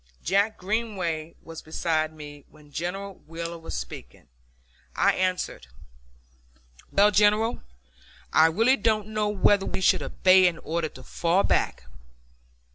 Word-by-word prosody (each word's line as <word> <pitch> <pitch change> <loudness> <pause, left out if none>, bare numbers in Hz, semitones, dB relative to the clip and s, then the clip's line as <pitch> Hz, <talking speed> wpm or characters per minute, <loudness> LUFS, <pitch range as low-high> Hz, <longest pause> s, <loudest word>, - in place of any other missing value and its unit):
Jack 200 +5 +1
Greenway 185 -6 -3
was 165 -1 -9
beside 155 0 -1
me 145 -2 -11
when 150 -1 -20
General 190 +5 -5
Wheeler 170 +1 -6
was 165 - -7
speaking. - - -9 0.7
I - - +3
answered, 185 - -2 1.2
"Well, 205 +1 +4
General, 210 +3 +2 0.7
I 160 +1 +6
really 225 +11 +3
don't 215 -1 0
know 215 -1 -1
whether 205 -1 +2
we 190 - -3
would - - -5
obey 185 0 +4
an 170 -2 -1
order 165 -1 -3
to 130 - -14
fall 170 +8 0
back. - - 0
180 Hz, 125 wpm, -25 LUFS, 160-205 Hz, 1.2 s, I